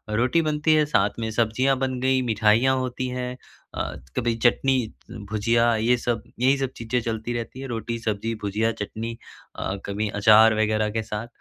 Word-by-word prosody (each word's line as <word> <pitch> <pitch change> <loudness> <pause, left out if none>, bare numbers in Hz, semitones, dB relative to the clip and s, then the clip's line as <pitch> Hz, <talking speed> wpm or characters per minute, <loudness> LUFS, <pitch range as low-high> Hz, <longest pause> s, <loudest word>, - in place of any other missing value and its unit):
रोटी 125 +9 +2
बनती 155 0 +1
है 155 - +4
साथ 105 -9 +2
में 110 -1 -2
सब्जियाँ 120 +4 +1
बन 130 -1 -2
गई 130 0 +2
मिठाइयाँ 115 +2 +3
होती 130 0 -3
हैं 125 0 -4 0.4
अ, - - -3 0.2
कभी 120 -2 +1
चटनी 135 +2 +3 0.5
भुजिया 115 +2 +2
ये 115 +3 +2
सब, 120 -1 -2 0.2
यही 130 +3 +3
सब 135 -1 -2
चीज़ें 120 +2 -1
चलती 115 +1 -3
रहती 120 +2 -5
है, 135 - -6
रोटी-सब्ज़ी 115 -2 -3
भुजिया 105 +3 0
चटनी 115 +2 -5 0.4
अ, 95 - -3
कभी 105 +2 -2
अचार 110 +2 +7
वग़ैरह 110 0 +1
के 110 +1 -2
साथ। 105 +1 -5
115 Hz, 170 wpm, -24 LUFS, 110-130 Hz, 0.5 s, अचार